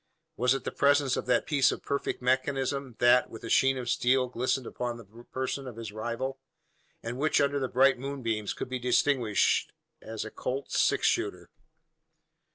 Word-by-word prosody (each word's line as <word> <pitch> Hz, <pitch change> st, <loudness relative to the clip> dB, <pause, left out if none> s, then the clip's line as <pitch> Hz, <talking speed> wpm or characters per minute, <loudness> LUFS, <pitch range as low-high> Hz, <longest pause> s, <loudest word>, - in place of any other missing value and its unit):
Was 125 Hz, +3 st, +2 dB
it 135 Hz, -, -4 dB
the -, -, -3 dB
presence 140 Hz, -2 st, +3 dB
of -, -, -4 dB
that 125 Hz, -1 st, +2 dB
piece 140 Hz, -4 st, +3 dB
of -, -, -6 dB
perfect 140 Hz, -2 st, -3 dB
mechanism, 130 Hz, 0 st, 0 dB
that, 120 Hz, +1 st, +4 dB
with 115 Hz, -, -11 dB
a 115 Hz, -, -5 dB
sheen 135 Hz, 0 st, +4 dB
of 125 Hz, -1 st, -5 dB
steel, 125 Hz, +1 st, +2 dB
glistened 125 Hz, +1 st, -1 dB
upon 120 Hz, 0 st, -4 dB
the 115 Hz, -, -12 dB, 0.3 s
person 130 Hz, +1 st, -3 dB
of 125 Hz, -, -8 dB
his 115 Hz, -2 st, -7 dB
rival, 120 Hz, +5 st, -4 dB, 0.6 s
and 115 Hz, +3 st, -5 dB
which 155 Hz, +1 st, +2 dB
under 140 Hz, 0 st, +1 dB
the 130 Hz, -, -1 dB
bright 130 Hz, +1 st, +3 dB
moonbeams, 115 Hz, -6 st, -3 dB
could -, -, -5 dB
be 130 Hz, 0 st, -4 dB
distinguished 125 Hz, -3 st, +2 dB, 0.3 s
as 110 Hz, -1 st, -6 dB
a 110 Hz, -, -7 dB
"Colt's 135 Hz, +2 st, -2 dB
six -, -, +2 dB
shooter?" -, -, -1 dB
125 Hz, 175 wpm, -28 LUFS, 120-135 Hz, 0.6 s, that